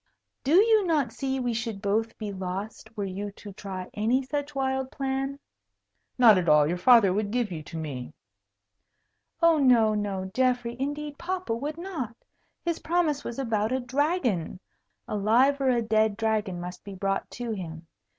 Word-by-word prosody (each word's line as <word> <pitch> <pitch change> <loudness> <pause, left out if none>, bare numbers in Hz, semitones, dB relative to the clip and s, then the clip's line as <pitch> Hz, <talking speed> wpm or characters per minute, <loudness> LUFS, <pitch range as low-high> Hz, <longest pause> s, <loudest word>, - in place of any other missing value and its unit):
Do 285 +5 +3
you 435 +2 +6
not 295 -8 +1
see 265 +1 -2
we 245 -2 -1
should 225 -3 -3
both 215 +3 -1
be 210 -2 -5
lost, 195 +4 -6
were 205 - -1
you 195 +2 -4
to 205 -1 -11
try 190 -2 -6
any 235 +6 +1
such 285 +2 -4
wild 265 -1 -1
plan?" 270 0 -2 0.8
"Not 225 -6 +7
at 170 -3 0
all. 150 -1 +6
Your 175 +4 -1
father 205 -2 +6
would 205 +1 -1
give 235 -2 -1
you 160 -3 -4
to 160 +2 -8
me." 140 -6 -5 1.3
"Oh, 330 -2 +6
no, 235 -5 +5
no, 195 -3 -2
Geoffrey; 245 -2 +1
indeed, 290 +1 -4
papa 365 -6 -2
would 290 +7 -4
not. 325 - -5 0.5
His 340 -1 -1
promise 320 -4 0
was 235 - -5
about 225 -4 0
a 260 - +1
dragon. 255 - 0 0.5
A - - -3
live 245 +7 +3
or 265 - +3
a 240 -2 +2
dead 220 -1 +2
dragon 215 -5 0
must 180 +1 -7
be 200 -1 -8
brought 195 +1 -1
to 240 -2 -5
him. 165 -5 -6
230 Hz, 170 wpm, -27 LUFS, 200-270 Hz, 1.3 s, Not